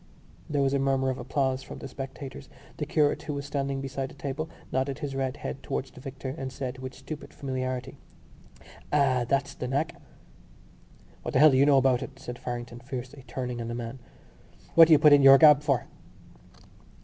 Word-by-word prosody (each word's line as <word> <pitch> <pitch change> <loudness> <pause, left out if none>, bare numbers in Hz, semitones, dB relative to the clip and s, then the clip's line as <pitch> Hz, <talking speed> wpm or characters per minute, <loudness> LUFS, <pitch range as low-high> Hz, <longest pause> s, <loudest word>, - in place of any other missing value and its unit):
There 145 -2 +1
was 135 0 +1
a 140 - +2
murmur 135 -1 +1
of 130 - -5
applause 130 +1 -1
from - - -9
the - - -7
spectators. 135 0 -8 0.3
The - - -3
curate, 150 -2 +2
who 150 - -4
was 140 0 -4
standing 140 -1 -2
beside 135 0 -4
the - - -14
table, 145 +3 -4 0.2
nodded 135 +1 -1
his 145 -3 -5
red 135 0 -2
head 135 - -6
towards 135 - -4
the 130 - -13
victor 135 0 -6
and 135 -1 -4
said 130 -1 -5
with 130 0 -7
stupid 145 +3 -8
familiarity: 130 -3 -4 0.9
"Ah! 130 -4 +3
that's 135 0 0
the 125 - -5
knack!" 140 +5 -2 1.2
"What - - -5
the - - +5
hell 155 +1 +8
do 130 - +3
you 140 +2 +5
know 140 -2 +6
about 130 -2 +3
it?" 135 - -8
said 125 -1 -8
Farrington 120 -1 -6
fiercely, 130 +1 -7
turning 125 -2 -4
on 115 - -4
the 115 - -4
man. 120 +2 -6 0.7
"What 165 -1 +9
do - - +1
you 155 - +9
put 150 0 +7
in 145 - +7
your 135 0 +9
gab 150 -1 +7
for?" 140 -5 0
135 Hz, 195 wpm, -27 LUFS, 130-140 Hz, 1.2 s, What